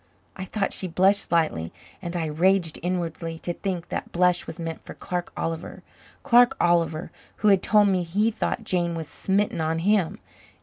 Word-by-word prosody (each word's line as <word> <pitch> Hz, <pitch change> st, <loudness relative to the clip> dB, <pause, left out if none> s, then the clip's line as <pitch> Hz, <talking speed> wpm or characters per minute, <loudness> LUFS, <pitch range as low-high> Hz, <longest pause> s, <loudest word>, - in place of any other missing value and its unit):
I 190 Hz, -, -6 dB
thought 200 Hz, +1 st, -2 dB
she 185 Hz, -, -3 dB
blushed 190 Hz, +4 st, +3 dB
slightly 155 Hz, -, 0 dB, 0.3 s
and 175 Hz, -1 st, -5 dB
I 165 Hz, -, -1 dB
raged 170 Hz, +2 st, +1 dB
inwardly 165 Hz, -2 st, -3 dB
to 175 Hz, +1 st, -4 dB
think 180 Hz, -2 st, -4 dB
that -, -, -4 dB
blush 180 Hz, 0 st, +2 dB
was -, -, -7 dB
meant 165 Hz, -1 st, -5 dB
for -, -, -10 dB
Clark 180 Hz, -1 st, -4 dB
Oliver 165 Hz, -1 st, -4 dB, 0.4 s
Clark 245 Hz, -1 st, +5 dB
Oliver 170 Hz, -1 st, +1 dB, 0.2 s
who 210 Hz, -, +2 dB
had 195 Hz, -2 st, +5 dB
told 210 Hz, 0 st, +4 dB
me 185 Hz, -2 st, +2 dB
he 200 Hz, +7 st, +1 dB
thought 225 Hz, +1 st, -2 dB
Jane 175 Hz, -4 st, -1 dB
was 160 Hz, -2 st, -5 dB
smitten 195 Hz, +3 st, 0 dB
on 160 Hz, +1 st, 0 dB
him! 190 Hz, 0 st, +1 dB
175 Hz, 175 wpm, -25 LUFS, 165-195 Hz, 0.4 s, Clark